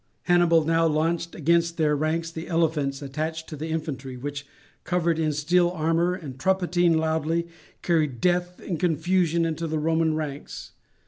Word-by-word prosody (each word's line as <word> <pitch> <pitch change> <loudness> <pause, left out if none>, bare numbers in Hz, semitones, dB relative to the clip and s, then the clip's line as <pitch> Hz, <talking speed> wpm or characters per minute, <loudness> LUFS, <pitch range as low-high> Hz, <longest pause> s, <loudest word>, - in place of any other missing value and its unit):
Hannibal 175 -3 +4
now 165 +1 +3
launched 165 +2 0
against 170 +1 +1
their 150 -2 +2
ranks 160 +2 -1
the 165 0 -7
elephants 150 -5 0
attached 160 +3 -4
to 155 - -6
the 155 +2 -5
infantry, 150 -5 -4
which, 145 +2 -6 0.4
covered 170 -1 0
in 155 -1 +1
steel 175 +4 +2
armour 170 +1 +1
and 140 -8 -9
trumpeting 175 -1 +2
loudly, 160 +1 0 0.4
carried 155 -8 +1
death 180 +2 0
and 170 -5 -4
confusion 170 0 +1
into 165 0 -2
the 155 0 -2
Roman 160 0 +1
ranks. 150 -2 -6
160 Hz, 150 wpm, -25 LUFS, 155-170 Hz, 0.4 s, Hannibal